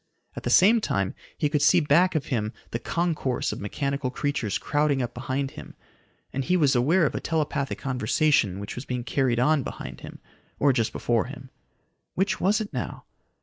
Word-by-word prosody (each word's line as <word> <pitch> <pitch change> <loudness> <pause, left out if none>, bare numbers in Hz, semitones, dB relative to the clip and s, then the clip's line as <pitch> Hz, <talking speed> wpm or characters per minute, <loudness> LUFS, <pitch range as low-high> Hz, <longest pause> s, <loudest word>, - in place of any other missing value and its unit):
At - - -5
the - - -3
same 220 +4 +6
time 100 - -1 0.2
he 150 - +1
could 145 0 0
see 175 +5 +6
back 170 +4 +3
of 150 - 0
him 110 -2 -1 0.2
the 115 - -2
concourse 165 -7 -1
of - - -6
mechanical 140 +5 -2
creatures 140 -6 -1
crowding 145 -2 +1
up 125 -2 -2
behind 130 +2 -3
him, - - -11 0.6
and 135 - -1
he 180 +6 +2
was 145 -5 +3
aware 155 +8 +3
of - - 0
a - - -2
telepathic 150 -3 -1
conversation 125 -5 +1
which 100 - -6
was 125 - -6
being 125 -2 -3
carried 130 -2 +1
on 150 +3 +3
behind - - -7
him - - -9 0.4
or 140 -1 +3
just 115 -3 0
before 115 -2 0
him. 130 0 -10 0.6
Which 195 +2 0
was 205 +4 +3
it 215 -2 -5
now? - - -4
140 Hz, 190 wpm, -26 LUFS, 125-155 Hz, 0.6 s, same